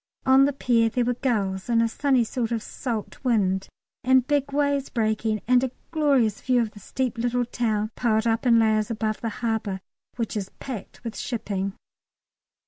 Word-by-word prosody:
On 265 +1 +6
the 285 - +1
pier 235 -4 +2
there 240 +2 0
were 245 - +1
gulls, 205 -6 -1
and 230 -1 +3
a 230 - +3
sunny 260 +1 +2
sort 230 0 -2
of 225 -2 -1
salt 230 -2 -5
wind 195 -6 +1 0.4
and 260 0 +4
big 285 0 0
waves 285 -1 +1
breaking, 220 -2 0
and 250 0 +4
a 260 - 0 0.2
glorious 280 -9 +2
view 255 -1 +2
of 225 -3 0
the 210 - -13
steep 245 +3 -3
little 245 +1 +1
town 220 -3 -1
piled 220 -2 +1
up 230 +2 +1
in 235 -1 +6
layers 220 -1 +3
above 215 -1 -2
the 230 - -1
harbour, 220 -4 -2 0.4
which 230 -3 -3
is 195 -2 -3
packed 245 -6 -7
with 230 -2 -5
shipping. 200 -5 -3
230 Hz, 180 wpm, -25 LUFS, 215-255 Hz, 0.4 s, On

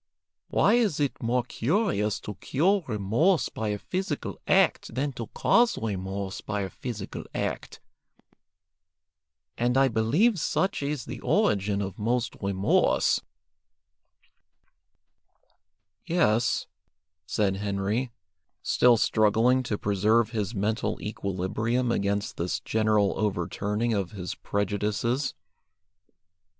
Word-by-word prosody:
Why - - +3
is 220 -11 +2
it 145 -2 -1
more 120 +1 +1
curious 125 - 0
to 105 - -6
cure 175 - +1
remorse 115 - +1
by 110 - -4
a 105 0 -1
physical 180 - -4
act - - +2
than 140 +2 0
to 115 -3 -6
cause 235 0 +3
remorse 95 -2 -4
by 105 -1 -3
a 95 - -4
physical 110 -6 -6
act? - - -3 1.8
And 120 +2 +2
I 135 0 +5
believe 150 - +2
such 190 +4 0
is 145 -1 -3
the - - -7
origin 100 0 +1
of 95 0 -6
most 120 +2 0
remorse." 100 0 +2 2.9
"Yes," 120 -10 +2 0.6
said 95 -2 0
Henry, 100 +5 -1 0.5
still 120 -1 +4
struggling 110 +4 +3
to 115 -4 -2
preserve 105 +3 +2
his 105 -1 -2
mental 105 +3 -1
equilibrium 105 +5 -1
against 100 -2 -1
this 85 +1 -1
general 110 -2 +2
overturning 105 +3 -1
of 100 -3 -2
his 90 -3 -5
prejudices. 105 +6 -1
110 Hz, 105 wpm, -27 LUFS, 100-125 Hz, 2.9 s, I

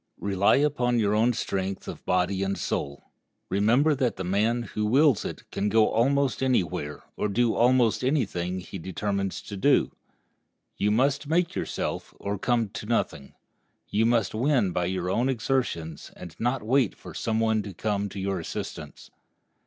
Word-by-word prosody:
Rely 100 0 +2
upon 130 -4 +1
your 105 -2 +2
own 115 +3 +3
strength 95 -4 -3
of - - -7
body 90 +1 +1
and 95 0 -1
soul. 70 0 -4 0.4
Remember 120 +10 +3
that 130 -4 0
the 95 - -5
man 110 +6 +1
who 105 0 -4
wills 135 +1 +4
it - - -6
can 105 - -1
go 110 +1 +4
almost 135 +4 +2
anywhere 85 - -1
or - - -1
do 115 +3 +2
almost 120 -1 +3
any 135 -1 +2
thing 90 0 -3
he 95 +1 -8
determines 100 +2 -3
to 100 - -7
do. 140 +9 +3 0.8
You 105 - +1
must 135 +6 +1
make 170 +3 +1
yourself, - - -4
or 100 -1 -3
come 115 -2 +1
to 105 - -7
nothing. 90 -11 -2 0.5
You 110 +2 +2
must 115 -5 +1
win 120 -4 +2
by 90 0 0
your 90 0 -2
own 120 +6 +1
exertions, 110 - -2
and 85 -3 -10
not 120 0 0
wait 125 0 +2
for - - -11
some 110 -1 -1
one 110 -1 +2
to 100 - -7
come 100 +2 -2
to 100 - -7
your 95 -1 -1
assistance. 80 - -7
110 Hz, 170 wpm, -26 LUFS, 95-125 Hz, 0.8 s, wills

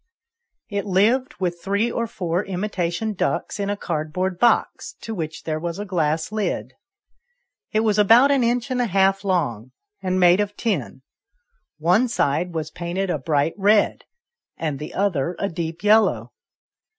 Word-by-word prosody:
IT 200 -2 -2
lived 220 +8 +2
with 175 -2 -2
three 205 +4 0
or 235 0 -2
four 180 -2 -2
imitation 190 +1 -2
ducks 205 - -2
in 200 0 -1
a 205 - -1
cardboard 175 +2 -3
box, 240 - +1
to 225 - -6
which 160 -5 -5
there 155 -1 -2
was 170 +1 -4
a 205 - -4
glass 160 -3 -1
lid. 175 - -2 1.0
It 215 - +2
was 215 -2 +1
about 230 +7 +6
an 275 -3 +3
inch 240 +2 0
and 250 -1 +1
a 245 - +1
half 195 0 +2
long, 130 - -1 0.3
and 185 0 0
made 180 +1 +5
of 205 0 -2
tin: 135 - -2 0.7
one 180 +10 +3
side 175 - 0
was 160 -1 -4
painted 175 +3 -3
a 155 - -1
bright 145 +3 0
red, 205 +1 +3 0.5
and 150 -4 -3
the 150 - -7
other 180 -4 0
a 200 - -1
deep 165 -1 -5
yellow. 205 - +3
185 Hz, 160 wpm, -22 LUFS, 165-210 Hz, 1.0 s, about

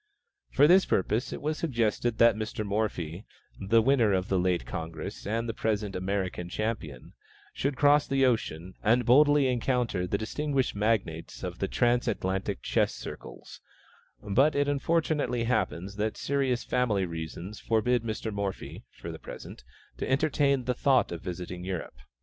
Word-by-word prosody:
For 140 - +5
this 185 +3 +6
purpose 110 +5 0
it - - -6
was 155 +1 -1
suggested 120 -5 0
that 115 -1 +6
Mr. 110 0 -4
Morphy, 100 -4 -2 0.4
the 110 +4 +3
winner 115 -6 +3
at 95 0 -2
the 95 - +2
late 90 -1 +1
Congress 80 +5 -6
and 115 +2 -1
the 115 - -2
present 105 -3 -1
American 95 -2 -2
champion, 105 - -4 0.4
should 140 -1 -2
cross 145 0 +4
the 135 -1 +3
ocean, 95 -8 -1
and 120 +3 +3
boldly 145 +3 +5
encounter 125 -6 0
the 100 - 0
distinguished 135 +4 -1
magnates 100 -6 -1
of - - -5
the - - 0
transatlantic 100 - 0
chess - - +1
circles; - - -9 0.6
but 130 +9 +3
it 145 0 +2
unfortunately 145 -3 0
happens 100 -5 -1
that 110 +1 -1
serious 135 -3 0
family 110 -7 +1
reasons 85 +4 -6
forbid 120 +2 +1
Mr. 110 -1 -4
Morphy, 100 -1 -4 0.2
for - - -6
the - - -9
present, - - -10 0.3
to - - -3
entertain 140 -1 +2
the 125 - 0
thought 130 0 +2
of 85 -1 -5
visiting 90 0 -6
Europe. 90 -8 -5
110 Hz, 150 wpm, -28 LUFS, 95-130 Hz, 0.6 s, this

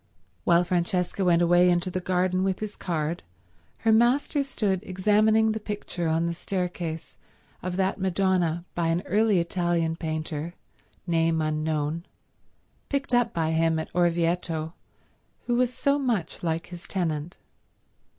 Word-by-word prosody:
While 170 0 +5
Francesca 180 +2 0
went 175 -1 +4
away 175 +1 +5
into 175 +1 +1
the 185 - -1
garden 185 0 +1
with 190 -1 0
his 215 -1 -5
card, 165 -1 -2 0.6
her 225 - +5
master 245 +5 +3
stood 210 -8 -1
examining 215 +3 +3
the 220 - -2
picture 205 -5 -4
on 160 +1 +1
the 170 - -1
staircase 175 -3 -4 0.5
of 180 0 -3
that 190 +1 0
Madonna 185 -3 +1
by 170 -1 0
an 165 +2 0
early 210 -1 +3
Italian 170 -1 0
painter, 160 0 -4 0.5
name 165 -2 +2
unknown, 155 +1 -1 0.8
picked 280 -2 -2
up 245 -1 +3
by 160 -4 0
him 160 0 +2
at 160 - -5
Orvieto, 170 -2 0 0.7
who 240 - 0
was 250 0 +2
so 280 +3 +1
much 230 - -1
like 165 -1 -1
his 175 -1 -10
tenant. 165 -2 -2
175 Hz, 140 wpm, -26 LUFS, 165-195 Hz, 0.8 s, While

